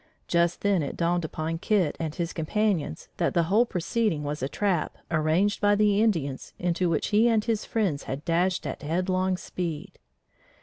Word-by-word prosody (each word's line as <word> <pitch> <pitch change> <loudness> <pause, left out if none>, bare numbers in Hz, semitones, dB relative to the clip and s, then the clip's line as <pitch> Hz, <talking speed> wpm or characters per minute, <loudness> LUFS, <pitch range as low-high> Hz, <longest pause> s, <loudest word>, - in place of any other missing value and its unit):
Just 170 0 +1
then 200 -4 +2
it 140 - -4
dawned 175 0 +1
upon 160 +1 -3
Kit 185 -6 +1
and 160 -2 -3
his 170 -2 -3
companions 170 - -1
that - - 0
the 170 - +4
whole 210 +8 +3
proceeding 185 -4 -1
was 145 +1 -3
a 135 - -1
trap 190 -4 -1
arranged 165 +6 +2
by 205 0 +4
the 205 0 +3
Indians 160 -12 -1
into 175 0 0
which 160 -3 0
he 220 +3 +4
and 220 -2 +2
his 225 -2 -1
friends 190 -11 -1
had 135 +4 -5
dashed 180 +2 +1
at - - -5
headlong 185 +4 0
speed. 170 -4 -5
175 Hz, 175 wpm, -27 LUFS, 160-205 Hz, -, the